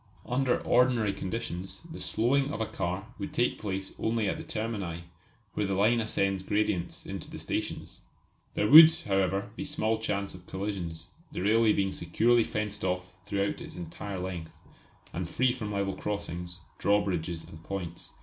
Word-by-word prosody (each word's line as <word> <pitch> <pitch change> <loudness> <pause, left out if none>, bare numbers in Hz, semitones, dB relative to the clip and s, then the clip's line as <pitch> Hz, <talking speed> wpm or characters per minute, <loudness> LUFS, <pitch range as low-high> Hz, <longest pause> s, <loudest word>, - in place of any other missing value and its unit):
Under 125 0 +1
ordinary 120 -5 +3
conditions 95 -2 -4
the - - -7
slowing 135 +5 +2
of - - -4
a 110 - +1
car 90 +1 -3
would 100 - -4
take 120 - +1
place 95 -2 -3
only 110 -1 +1
at - - 0
the - - -6
termini, 100 -7 -3 0.5
where 105 - 0
the 95 - 0
line 110 +5 +4
ascends 100 -3 0
gradients 95 -3 -1
into - - -5
the - - -7
stations. - - -4 0.5
There 105 - +2
would, 155 +5 +12
however, 95 0 0
be 150 - -4
small 115 -7 0
chance 100 -2 -2
of 90 -1 -13
collisions, 90 -5 -4 0.2
the - - -4
railway 110 +2 +4
being 95 -1 +1
securely 115 +8 +3
fenced 105 -1 -3
off 90 0 -1
throughout 100 0 -1
its - - -8
entire 90 +3 -6
length, 90 -3 -5 0.6
and 85 0 -3
free 130 +5 +3
from 110 -4 -4
level 100 -1 0
crossings, 90 -3 -4 0.2
drawbridges 90 -5 +1
and 80 - -12
points. 90 -3 -5
100 Hz, 160 wpm, -29 LUFS, 90-110 Hz, 0.6 s, would